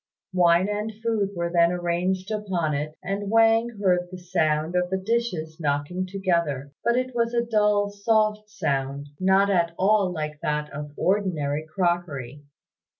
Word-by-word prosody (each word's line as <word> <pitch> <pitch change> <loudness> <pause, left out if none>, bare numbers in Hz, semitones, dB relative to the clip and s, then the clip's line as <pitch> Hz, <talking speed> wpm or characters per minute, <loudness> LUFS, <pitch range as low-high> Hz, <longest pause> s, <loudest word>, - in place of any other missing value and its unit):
Wine 175 0 +4
and 210 +1 -2
food 220 -4 +1
were 170 0 -2
then 170 -1 +4
arranged 180 +3 -1
upon 190 -7 -1
it, 150 +2 -3
and 195 +2 -3
Wang 225 +1 +4
heard 180 -3 +2
the 185 - -8
sound 165 -2 0
of 180 0 +1
the 190 - 0
dishes 190 -7 -2
knocking 150 +5 -1
together, 170 -8 -1
but 235 +1 +2
it 255 0 -1
was 235 0 0
a 235 0 +2
dull, 210 -2 +2
soft 215 0 +1
sound, 140 -6 -2
not 190 +2 +4
at 170 -3 +1
all 195 -1 +3
like 155 -3 -4
that 150 0 -2
of 150 +1 -6
ordinary 155 -7 0
crockery. 155 -6 -2
180 Hz, 150 wpm, -25 LUFS, 155-205 Hz, -, Wine